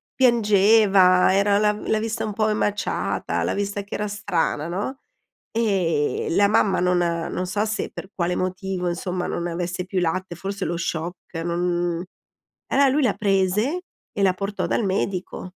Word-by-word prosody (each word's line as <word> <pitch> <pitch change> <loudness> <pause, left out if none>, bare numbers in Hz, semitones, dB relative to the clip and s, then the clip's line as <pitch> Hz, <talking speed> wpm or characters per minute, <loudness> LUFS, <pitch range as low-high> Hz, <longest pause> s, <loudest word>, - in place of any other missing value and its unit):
piangeva, 205 -6 +5
era 200 +1 +3
la 210 0 +3
l'ha 215 +1 -1
vista 225 0 -2
un 210 - -4
po' 215 +1 +1
emaciata, 210 -1 -1
l'ha - - 0
vista 200 0 -2
che 200 - -7
era 210 - -2
strana, 165 -6 -1
no, 205 - -4 0.5
e 190 -10 0
la 200 +4 +4
mamma 195 -3 +3
non 180 0 +2
non 170 +1 -1
so 205 +3 0
se 215 -1 -2
per 190 - -8
quale 180 -1 -1
motivo 185 0 -2
insomma 180 +1 -3
non 170 - -2
avesse 175 +1 -3
più 185 0 -1
latte, 175 +1 -1
forse 195 +2 -4
lo 170 +1 -2
shock, 170 +1 -5
non 175 0 -1 0.6
eh 275 0 +4
lui 290 +3 +2
la 245 -6 +3
prese 210 - +1 0.3
e 200 - -2
la 190 -1 +4
portò 200 +2 -3
dal 225 - 0
medico. 190 -1 -2
190 Hz, 160 wpm, -23 LUFS, 180-210 Hz, 0.6 s, piangeva